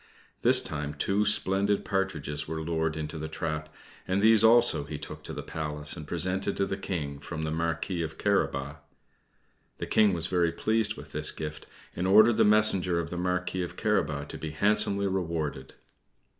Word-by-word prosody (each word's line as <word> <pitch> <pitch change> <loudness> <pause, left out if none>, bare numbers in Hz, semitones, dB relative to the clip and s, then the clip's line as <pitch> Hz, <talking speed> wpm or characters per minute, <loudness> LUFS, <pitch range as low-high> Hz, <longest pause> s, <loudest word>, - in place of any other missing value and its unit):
This - - +6
time 75 -1 -4
two 100 +8 0
splendid 100 0 +2
partridges 75 -7 -2
were 80 0 -4
lured 80 -1 -1
into 80 +1 -5
the 80 - -4
trap, 75 -1 -4 0.4
and 95 +1 0
these 110 +1 +6
also 115 -8 +5
he - - -6
took - - -8
to - - -6
the - - -6
Palace 75 -1 -3
and 75 - -9
presented 95 +4 -1
to 100 - +1
the 95 - -3
King 80 -7 -5
from 80 +2 -6
the 80 - -2
Marquis 85 +2 -2
of 80 -1 -5
Carabas. 70 +2 -1 1.0
The - - -4
King 105 -3 +3
was 85 -2 -1
very 85 -2 +1
pleased 110 +4 0
with - - -11
this - - +3
gift, 75 0 -7 0.3
and 90 +2 -1
ordered 110 +4 +6
the - - +5
messenger 105 -4 +3
of 85 - -5
the 90 - -4
Marquis 90 +1 -2
of 90 - -5
Carabas 75 0 0
to - - -7
be 80 - -5
handsomely 100 +4 +2
rewarded. 80 -8 -3
85 Hz, 180 wpm, -28 LUFS, 75-100 Hz, 1.0 s, This